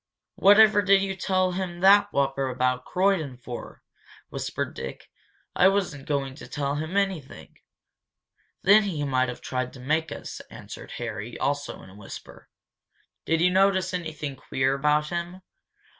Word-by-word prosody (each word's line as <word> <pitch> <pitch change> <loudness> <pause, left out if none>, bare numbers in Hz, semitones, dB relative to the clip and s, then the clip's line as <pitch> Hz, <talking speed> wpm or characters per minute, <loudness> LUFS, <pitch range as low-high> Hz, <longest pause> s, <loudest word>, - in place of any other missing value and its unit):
"Whatever 205 +1 +6
did 195 0 +4
you 195 -1 -2
tell 185 0 +1
him 180 -1 -4
that 200 +1 +6
whopper 135 -1 0
about 125 0 0
Croydon 180 -9 0
for?" 120 0 -9 0.5
whispered - - -4
Dick. - - -8 0.4
"I 185 - +6
wasn't 185 -8 -1
going 140 -2 -1
to - - -10
tell 140 -1 -2
him 155 +6 -3
anything 190 -8 -3 0.5
" - - -45
"Then 205 +3 +7
he 180 -8 -3
might 130 -2 +1
have 125 - -7
tried 130 -1 -3
to 130 - -12
make 155 +4 -1
us," - - -7
answered - - -10
Harry, 105 +5 -5
also 145 0 -2
in 95 - -14
a - - -15
whisper. 100 -2 -11 0.8
"Did 165 0 +1
you 180 +1 +4
notice 190 -1 +2
anything 155 -5 -4
queer 130 +1 0
about 150 +2 +1
him?" 175 +2 -5
160 Hz, 155 wpm, -26 LUFS, 135-190 Hz, 0.8 s, Then